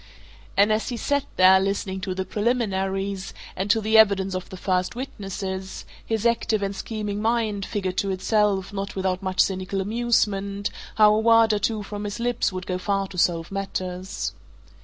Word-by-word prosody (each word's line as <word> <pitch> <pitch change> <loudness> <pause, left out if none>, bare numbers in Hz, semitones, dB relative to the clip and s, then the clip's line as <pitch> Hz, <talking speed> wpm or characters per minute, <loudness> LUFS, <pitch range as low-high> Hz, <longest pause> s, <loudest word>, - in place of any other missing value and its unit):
And 205 +2 +5
as 220 +3 -1
he 240 - -3
sat 285 +4 0
there, 185 +1 +7
listening 190 0 -2
to 185 0 -3
the 190 0 -2
preliminaries, 195 -4 -1 0.2
and 190 +2 -2
to 225 - +4
the 220 +1 +4
evidence 195 -3 +4
of 185 0 -4
the 185 - -8
first 185 +2 0
witnesses, 195 -6 -5 0.2
his 225 0 -2
active 230 -3 +1
and 195 0 -2
scheming 210 0 -4
mind 220 -3 0
figured 190 -3 -3
to 200 - 0
itself, 195 0 +1
not 195 0 -4
without 190 -1 -1
much 185 -1 -4
cynical 190 0 -1
amusement, 200 -2 0 0.2
how 210 -1 +6
a 215 - +2
word 225 0 +5
or 210 - +1
two 215 +1 -1
from 205 +1 -6
his 205 +2 -4
lips 240 -2 0
would 185 -1 -5
go 180 -1 -2
far 195 0 0
to 185 - -10
solve 170 0 +1
matters. 185 -1 -4
200 Hz, 180 wpm, -24 LUFS, 190-215 Hz, 0.2 s, there